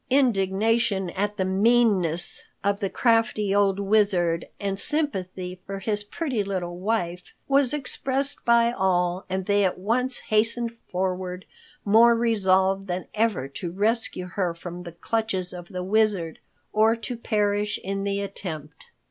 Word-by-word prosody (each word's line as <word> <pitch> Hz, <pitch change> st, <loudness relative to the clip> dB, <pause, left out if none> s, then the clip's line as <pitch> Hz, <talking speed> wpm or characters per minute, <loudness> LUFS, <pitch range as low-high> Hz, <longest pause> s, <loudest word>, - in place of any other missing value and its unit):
Indignation 215 Hz, -5 st, +2 dB
at 205 Hz, +2 st, -2 dB
the 190 Hz, -, 0 dB
meanness 195 Hz, -4 st, +2 dB, 0.2 s
of 200 Hz, 0 st, +1 dB
the 195 Hz, -3 st, -1 dB
crafty 225 Hz, -4 st, +2 dB
old 200 Hz, -1 st, +2 dB
Wizard 195 Hz, -5 st, +2 dB
and 195 Hz, -1 st, -1 dB
sympathy 185 Hz, -, -1 dB
for 195 Hz, 0 st, -4 dB
his 205 Hz, +1 st, -2 dB
pretty 250 Hz, -1 st, -2 dB
little 185 Hz, -3 st, -3 dB
wife 180 Hz, -4 st, -2 dB
was 275 Hz, -2 st, +4 dB
expressed 275 Hz, -1 st, -2 dB
by 235 Hz, 0 st, +4 dB
all, 180 Hz, -3 st, 0 dB
and 190 Hz, 0 st, -2 dB
they 205 Hz, 0 st, +3 dB
at 185 Hz, -, 0 dB
once 245 Hz, +7 st, 0 dB
hastened 230 Hz, +2 st, 0 dB
forward, 185 Hz, 0 st, -3 dB, 0.4 s
more 230 Hz, +3 st, +6 dB
resolved 195 Hz, -4 st, +2 dB
than 180 Hz, 0 st, -3 dB
ever 215 Hz, -, 0 dB
to 170 Hz, +5 st, -5 dB
rescue 210 Hz, 0 st, 0 dB
her 180 Hz, -1 st, -2 dB
from 175 Hz, +1 st, -8 dB
the 175 Hz, -1 st, -8 dB
clutches 190 Hz, -1 st, -2 dB
of 175 Hz, -1 st, -8 dB
the 180 Hz, -2 st, -4 dB
Wizard, 195 Hz, -5 st, +1 dB, 0.3 s
or 220 Hz, +2 st, +4 dB
to 235 Hz, +2 st, -5 dB
perish 210 Hz, -2 st, 0 dB
in 195 Hz, +1 st, -3 dB
the 200 Hz, 0 st, -1 dB
attempt. 160 Hz, -7 st, -7 dB
200 Hz, 140 wpm, -25 LUFS, 185-225 Hz, 0.4 s, more